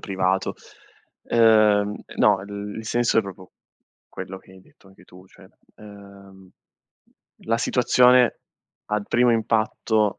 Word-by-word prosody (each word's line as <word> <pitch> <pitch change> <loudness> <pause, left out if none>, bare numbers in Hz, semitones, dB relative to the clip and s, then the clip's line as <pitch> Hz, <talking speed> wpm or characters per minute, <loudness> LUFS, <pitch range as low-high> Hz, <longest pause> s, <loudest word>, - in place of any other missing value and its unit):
privato. 95 0 -2 0.7
Ehm, 110 -3 +3
e - - -14
no, 95 - +3
il 100 0 -8
il 110 - -8
senso 120 0 +1
è - - +3
proprio 95 -2 -12 0.6
quello 95 0 -9
che 95 - -20
hai 95 - -16
detto 95 - -24
anche 95 -2 -21
tu, 90 +1 -18
cioè, 95 0 -19 0.3
ehm, 100 -2 -15 0.9
la 115 +1 -1
situazione 125 0 +3 0.5
al 105 -1 -2
primo 120 0 +2
impatto 110 -1 -1
105 Hz, 130 wpm, -22 LUFS, 95-110 Hz, 0.9 s, Ehm